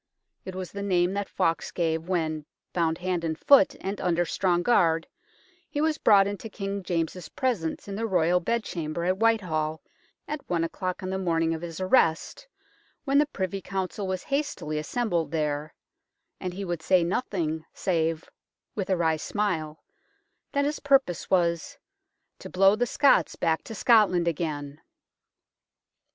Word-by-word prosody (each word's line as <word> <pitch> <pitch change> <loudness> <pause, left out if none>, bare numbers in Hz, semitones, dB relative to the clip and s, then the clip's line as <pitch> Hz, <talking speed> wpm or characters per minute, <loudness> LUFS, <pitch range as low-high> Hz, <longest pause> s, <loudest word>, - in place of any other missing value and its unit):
It 190 - -6
was 185 -1 -5
the 200 - -6
name 180 -2 +2
that 200 0 -3
Fawkes 165 0 0
gave 165 0 -1
when, 155 -4 -1 0.3
bound 165 -2 +1
hand 180 -2 -2
and 160 -1 -2
foot 275 -3 +5
and 195 +2 -4
under 175 -1 +1
strong 175 -1 +1
guard, 165 -8 +3 0.6
he 295 - -3
was 310 0 +1
brought 200 -2 +6
into 205 +3 -5
King 200 -1 -4
James's 175 0 -3
presence 210 -13 -2
in 200 - -5
the 225 +3 -2
royal 180 -2 +3
bedchamber 170 -6 -2
at 185 +1 +1
Whitehall 175 -9 +1 0.5
at 300 -1 -4
one 170 -2 +1
o'clock 185 +3 -3
on 185 - -3
the 190 - -2
morning 165 -3 +1
of 160 - -5
his 170 -1 -6
arrest, 185 - +1 0.6
when 280 0 +3
the 295 - +3
Privy 190 -7 -3
Council 190 +1 -3
was 185 -1 -3
hastily 275 - -2
assembled 170 -2 -1
there, 150 -1 -2 0.7
and 180 -1 -4
he 200 +1 -4
would 175 -3 -3
say 180 +1 +3
nothing 170 -5 -2
save 165 -3 -1 0.5
with 195 -3 -3
a 190 - +2
wry 160 -2 +2
smile 160 -5 -2 0.7
that 280 0 +2
his 295 +1 -1
purpose 270 -11 +2
was 170 -4 +1 0.3
" - - -53
to - - -9
blow 195 +2 +5
the 245 +3 0
Scots 280 +4 +3
back 160 -1 0
to 225 - -7
Scotland 200 -7 +4
again 150 -3 -3
180 Hz, 160 wpm, -27 LUFS, 165-200 Hz, 0.7 s, brought